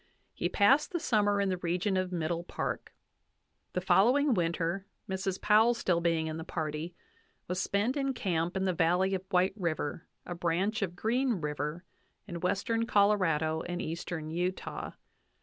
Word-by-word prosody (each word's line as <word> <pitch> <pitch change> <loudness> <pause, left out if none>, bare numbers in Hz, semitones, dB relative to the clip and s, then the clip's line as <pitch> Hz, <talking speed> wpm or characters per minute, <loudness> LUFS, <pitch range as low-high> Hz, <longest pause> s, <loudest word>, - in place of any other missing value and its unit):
He - - -1
passed 270 +9 +4
the 345 - 0
summer 205 -8 +2
in 200 -1 +1
the 185 -1 -1
region 180 +3 0
of 185 -1 0
Middle 170 0 -1
Park. - - -4 0.8
The 180 - -1
follow 205 +8 +5
ing 285 -2 +3
winter, 170 +1 -1 0.2
Mrs. 190 0 -2
Powell 220 +3 +5
still 175 -6 +1
being 165 -2 +1
in 160 0 -3
the 160 - -5
party, 160 +1 -4 0.5
was 180 +1 -1
spent 210 +6 0
in 275 -2 -1
camp 175 -4 -1
in 190 - 0
the 185 - +1
valley 180 +4 +2
of 190 -1 -1
White 185 0 +3
River, 170 -4 -3 0.2
a 175 - -4
branch 175 +5 0
of 180 -3 -2
Green 245 +7 +1
River, 150 -1 -3 0.4
in 170 -3 -5
western 225 +6 0
Colorado 175 -8 +2
and 175 0 -4
eastern 160 -1 -4
Utah. 180 +3 -3
180 Hz, 165 wpm, -30 LUFS, 170-205 Hz, 0.8 s, follow